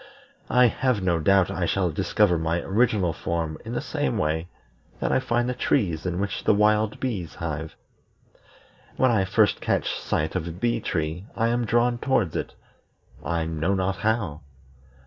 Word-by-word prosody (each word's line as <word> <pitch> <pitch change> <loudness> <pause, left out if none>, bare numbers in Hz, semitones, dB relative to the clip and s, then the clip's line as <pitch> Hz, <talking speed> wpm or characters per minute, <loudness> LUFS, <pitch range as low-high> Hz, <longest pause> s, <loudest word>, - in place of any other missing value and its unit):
I 125 0 +5
have 120 -3 +1
no 85 -2 +2
doubt 95 +2 +3
I 85 -2 -1
shall 90 -2 +1
discover 90 +1 +2
my 80 +1 0
original 100 -4 +1
form 80 -1 -3
in - - -6
the - - -1
same - - -2
way 80 +2 -1 0.5
that - - -1
I - - +3
find 120 -2 0
the 125 - 0
trees 85 -8 0
in 90 0 -2
which 100 0 -3
the 105 - +4
wild 105 +1 +2
bees 105 -11 -3
hive. 80 -1 -5 1.2
When 130 -1 +4
I 100 -5 +2
first 105 +2 +2
catch - - 0
sight 75 +1 -2
of 90 -3 -2
a - - -4
bee 115 +8 -1
tree 80 +3 -3
I 115 0 +1
am 120 0 0
drawn 120 +2 +2
towards 110 - +1
it, - - -4 0.7
I 85 -1 -1
know 80 +4 0
not 95 0 -1
how. 100 -7 -1
95 Hz, 170 wpm, -25 LUFS, 85-110 Hz, 1.2 s, I